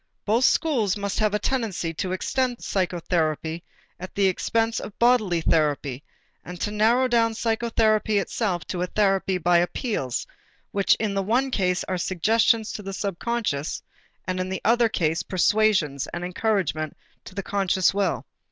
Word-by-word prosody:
Both 230 Hz, +4 st, +3 dB
schools 235 Hz, -, +2 dB
must 200 Hz, -1 st, -3 dB
have 215 Hz, -1 st, +2 dB
the 210 Hz, -, +1 dB
tendency 210 Hz, -8 st, -2 dB
to 180 Hz, +3 st, -3 dB
extend 245 Hz, +6 st, -1 dB
psychotherapy 170 Hz, -3 st, -1 dB, 0.4 s
at 185 Hz, +1 st, -8 dB
the 200 Hz, -, +2 dB
expense 225 Hz, +4 st, +1 dB
of 205 Hz, -, -9 dB
bodily 220 Hz, -8 st, +3 dB
therapy 145 Hz, -4 st, 0 dB, 0.4 s
and 180 Hz, -1 st, -9 dB
to 210 Hz, -, -2 dB
narrow 230 Hz, +5 st, +3 dB
down 230 Hz, -2 st, +2 dB
psychotherapy 220 Hz, -2 st, +1 dB
itself 185 Hz, -3 st, -1 dB
to 180 Hz, -, -3 dB
a 180 Hz, -, 0 dB
therapy 195 Hz, -1 st, +1 dB
by 175 Hz, 0 st, +3 dB
appeals 175 Hz, -, -2 dB, 0.5 s
which 200 Hz, -1 st, +3 dB
in 215 Hz, -2 st, -2 dB
the 195 Hz, -, 0 dB
one 245 Hz, +7 st, +1 dB
case 180 Hz, -5 st, 0 dB
are 185 Hz, -1 st, -3 dB
suggestions 220 Hz, +5 st, +2 dB
to -, -, -6 dB
the 195 Hz, -1 st, -6 dB
subconscious 200 Hz, -5 st, -2 dB, 0.4 s
and 185 Hz, +1 st, -2 dB
in 185 Hz, 0 st, -2 dB
the 190 Hz, -, -4 dB
other 235 Hz, 0 st, +4 dB
case 165 Hz, -5 st, 0 dB
persuasions 185 Hz, -7 st, +1 dB
and 175 Hz, -, -6 dB
encouragements 180 Hz, -6 st, -1 dB, 0.3 s
to 185 Hz, -, -11 dB
the 195 Hz, -, -3 dB
conscious 190 Hz, -2 st, +1 dB
will. 195 Hz, -2 st, -1 dB
195 Hz, 155 wpm, -24 LUFS, 175-225 Hz, 0.5 s, other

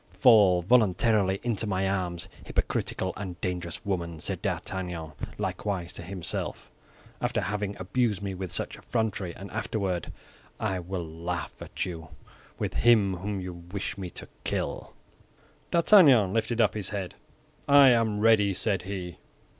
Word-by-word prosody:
"Fall 100 Hz, -, +6 dB
voluntarily 105 Hz, -2 st, +3 dB
into 115 Hz, -3 st, -1 dB
my 95 Hz, -1 st, 0 dB
arms, 90 Hz, -3 st, -2 dB, 0.2 s
hypocritical 95 Hz, -, -1 dB
and 95 Hz, -3 st, -6 dB
dangerous 90 Hz, 0 st, -4 dB
woman," 85 Hz, -5 st, -2 dB
said -, -, -4 dB
D'Artagnan, 90 Hz, -4 st, -3 dB, 0.3 s
likewise 95 Hz, -5 st, -3 dB
to -, -, -6 dB
himself, 90 Hz, 0 st, -4 dB, 0.5 s
"after -, -, 0 dB
having 105 Hz, 0 st, -2 dB
abused 105 Hz, +2 st, 0 dB
me 100 Hz, -1 st, -4 dB
with 95 Hz, -1 st, -5 dB
such -, -, -2 dB
effrontery, 105 Hz, -6 st, -2 dB
and 100 Hz, +1 st, -9 dB
afterward 100 Hz, -5 st, -2 dB, 0.5 s
I 95 Hz, -1 st, -1 dB
will 90 Hz, 0 st, -4 dB
laugh 85 Hz, +2 st, -4 dB
at -, -, -4 dB
you 85 Hz, -4 st, -6 dB, 0.5 s
with -, -, -2 dB
him 105 Hz, -6 st, +4 dB
whom 100 Hz, +2 st, -3 dB
you 90 Hz, -1 st, -5 dB
wish 90 Hz, +3 st, -5 dB
me 95 Hz, -3 st, -5 dB
to -, -, -7 dB, 0.2 s
kill." -, -, -3 dB, 0.7 s
D'Artagnan 150 Hz, -, +6 dB
lifted 115 Hz, +1 st, 0 dB
up 105 Hz, -5 st, +4 dB
his 105 Hz, -3 st, -2 dB
head. 100 Hz, -3 st, -4 dB, 0.5 s
"I 140 Hz, -1 st, +8 dB
am 115 Hz, -4 st, +2 dB
ready," 105 Hz, -3 st, +4 dB
said 100 Hz, -2 st, 0 dB
he. 90 Hz, -2 st, -6 dB
95 Hz, 140 wpm, -28 LUFS, 90-110 Hz, 0.7 s, I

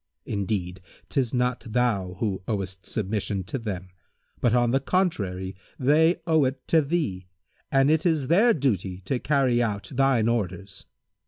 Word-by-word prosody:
Indeed, 95 Hz, -3 st, -3 dB, 0.3 s
'tis 130 Hz, -5 st, 0 dB
not 125 Hz, -1 st, 0 dB
thou 110 Hz, -6 st, 0 dB
who 95 Hz, -1 st, -2 dB
owest 95 Hz, -3 st, -4 dB
submission 100 Hz, -1 st, -2 dB
to 95 Hz, +9 st, -4 dB
them; 95 Hz, -5 st, -5 dB, 0.5 s
but 120 Hz, -1 st, +2 dB
on 120 Hz, -1 st, +3 dB
the 135 Hz, -, +3 dB
contrary 100 Hz, -, -1 dB, 0.2 s
they 155 Hz, +6 st, +4 dB
owe 160 Hz, -3 st, +3 dB
it 130 Hz, 0 st, -4 dB
to 160 Hz, -, +5 dB
thee, 140 Hz, -, -2 dB, 0.4 s
and 135 Hz, +2 st, +4 dB
it 160 Hz, 0 st, +2 dB
is 160 Hz, -6 st, +1 dB
their 205 Hz, -, +4 dB
duty 95 Hz, -, -1 dB
to 125 Hz, +7 st, -2 dB
carry 130 Hz, -4 st, +2 dB
out 105 Hz, -1 st, -2 dB
thine 130 Hz, -4 st, +3 dB
orders. 100 Hz, -4 st, -3 dB
120 Hz, 150 wpm, -25 LUFS, 95-135 Hz, 0.5 s, to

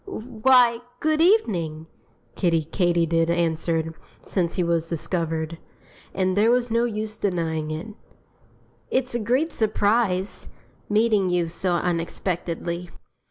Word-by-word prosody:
"Why, 245 Hz, -, +3 dB, 0.2 s
good 310 Hz, 0 st, +1 dB
evening!" 180 Hz, -, +2 dB, 0.5 s
Kiddie 165 Hz, -4 st, +1 dB
Katydid 165 Hz, -1 st, +1 dB
answered, 165 Hz, -1 st, 0 dB, 0.3 s
since 175 Hz, -3 st, -1 dB
he 180 Hz, -, +1 dB
was 165 Hz, -1 st, 0 dB
discovered 165 Hz, -1 st, -2 dB, 0.5 s
and 185 Hz, -1 st, 0 dB
there 210 Hz, +3 st, +4 dB
was 245 Hz, -1 st, +2 dB
no 230 Hz, +1 st, +2 dB
use 215 Hz, -1 st, -4 dB
denying 165 Hz, -5 st, -1 dB
it. 155 Hz, +7 st, -5 dB, 1.0 s
"It's 260 Hz, -1 st, 0 dB
a 240 Hz, -, 0 dB
great 255 Hz, +9 st, +1 dB
surprise 205 Hz, -4 st, 0 dB, 0.4 s
meeting 210 Hz, -3 st, +3 dB
you 175 Hz, -1 st, +1 dB
so 175 Hz, +2 st, -1 dB
unexpectedly. 170 Hz, 0 st, -2 dB
180 Hz, 115 wpm, -24 LUFS, 165-225 Hz, 1.0 s, there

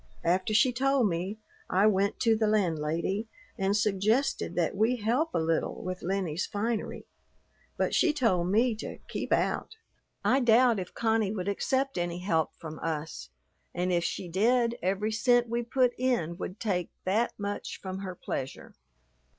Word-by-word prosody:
After 185 Hz, +4 st, +1 dB
she 245 Hz, +4 st, +4 dB
told 270 Hz, -1 st, +2 dB
me, 185 Hz, +4 st, -2 dB, 0.3 s
I 190 Hz, +3 st, +3 dB
went 200 Hz, -1 st, +2 dB
to 225 Hz, -2 st, +4 dB
the 220 Hz, 0 st, +1 dB
landlady 180 Hz, +1 st, 0 dB, 0.3 s
and 195 Hz, +2 st, +1 dB
suggested 215 Hz, +5 st, +1 dB
that 175 Hz, 0 st, 0 dB
we 220 Hz, +5 st, +2 dB
help 245 Hz, +8 st, 0 dB
a -, -, +3 dB
little 165 Hz, 0 st, -1 dB
with 185 Hz, 0 st, -4 dB
Lennie's 185 Hz, -2 st, -1 dB
finery; 220 Hz, +2 st, -3 dB, 0.7 s
but -, -, 0 dB
she 335 Hz, -, +4 dB
told 225 Hz, -, +1 dB
me 230 Hz, +5 st, +3 dB
to -, -, -6 dB
"keep -, -, -4 dB
out." -, -, 0 dB, 0.5 s
"I 265 Hz, -, +4 dB
doubt 240 Hz, -2 st, +5 dB
if 180 Hz, -, -7 dB
Connie 220 Hz, -3 st, +1 dB
would 190 Hz, -3 st, -4 dB
accept 265 Hz, +5 st, 0 dB
any 175 Hz, 0 st, -2 dB
help 170 Hz, -4 st, 0 dB
from 155 Hz, -1 st, -8 dB
us, 160 Hz, -1 st, -4 dB, 0.5 s
and 180 Hz, +1 st, 0 dB
if 170 Hz, -1 st, +2 dB
she 180 Hz, -, -3 dB
did, 235 Hz, +6 st, +2 dB
every 195 Hz, +4 st, 0 dB
cent 245 Hz, +2 st, +3 dB
we 235 Hz, +1 st, -1 dB
put 250 Hz, +1 st, +2 dB
in 240 Hz, -11 st, 0 dB
would 185 Hz, +1 st, -6 dB
take 180 Hz, -6 st, -1 dB, 0.2 s
that 215 Hz, +6 st, +1 dB
much 205 Hz, 0 st, -4 dB
from 190 Hz, 0 st, -5 dB
her 185 Hz, -2 st, -5 dB
pleasure. 135 Hz, -5 st, -5 dB
205 Hz, 160 wpm, -29 LUFS, 180-235 Hz, 0.7 s, doubt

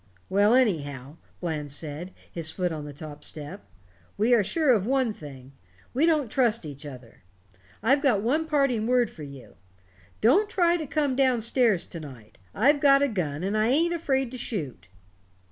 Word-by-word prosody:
"Well, 205 Hz, +4 st, +4 dB
anyhow," 145 Hz, -, 0 dB, 0.2 s
Bland 155 Hz, -4 st, -3 dB
said, 155 Hz, +5 st, -6 dB, 0.2 s
his 165 Hz, -2 st, -2 dB
foot 180 Hz, +1 st, -2 dB
on 155 Hz, -2 st, -5 dB
the 145 Hz, -, -7 dB
top 145 Hz, 0 st, -10 dB
step, 145 Hz, -8 st, -7 dB, 0.5 s
"we 225 Hz, +4 st, +3 dB
are 230 Hz, -4 st, +5 dB
sure 285 Hz, -, +2 dB
of 210 Hz, -2 st, 0 dB
one 260 Hz, -4 st, +1 dB
thing 135 Hz, -6 st, -11 dB, 0.4 s
we 295 Hz, +6 st, +2 dB
don't 300 Hz, -8 st, +1 dB
trust 230 Hz, -7 st, +1 dB
each 145 Hz, 0 st, -8 dB
other. 125 Hz, -4 st, -12 dB, 0.6 s
I've 270 Hz, +5 st, +3 dB
got 240 Hz, -9 st, +2 dB
one 305 Hz, +8 st, 0 dB
parting 275 Hz, -8 st, +1 dB
word 250 Hz, -1 st, +2 dB
for 160 Hz, -, -13 dB
you. 140 Hz, -3 st, -11 dB, 0.6 s
Don't 370 Hz, -, +4 dB
try 350 Hz, -5 st, +2 dB
to 315 Hz, -4 st, -4 dB
come 285 Hz, -2 st, 0 dB
down 260 Hz, -3 st, +2 dB
stairs 230 Hz, -5 st, +2 dB
to 170 Hz, -, -8 dB
night. 125 Hz, -10 st, -12 dB, 0.2 s
I've 285 Hz, +8 st, +4 dB
got 280 Hz, -1 st, +5 dB
a -, -, +3 dB
gun, 170 Hz, -, -3 dB
and 200 Hz, +3 st, -1 dB
I 215 Hz, +1 st, +2 dB
ain't 325 Hz, +7 st, +2 dB
afraid 270 Hz, -7 st, -1 dB
to 255 Hz, -, -7 dB
shoot." 145 Hz, -, -5 dB
215 Hz, 180 wpm, -26 LUFS, -, 0.6 s, are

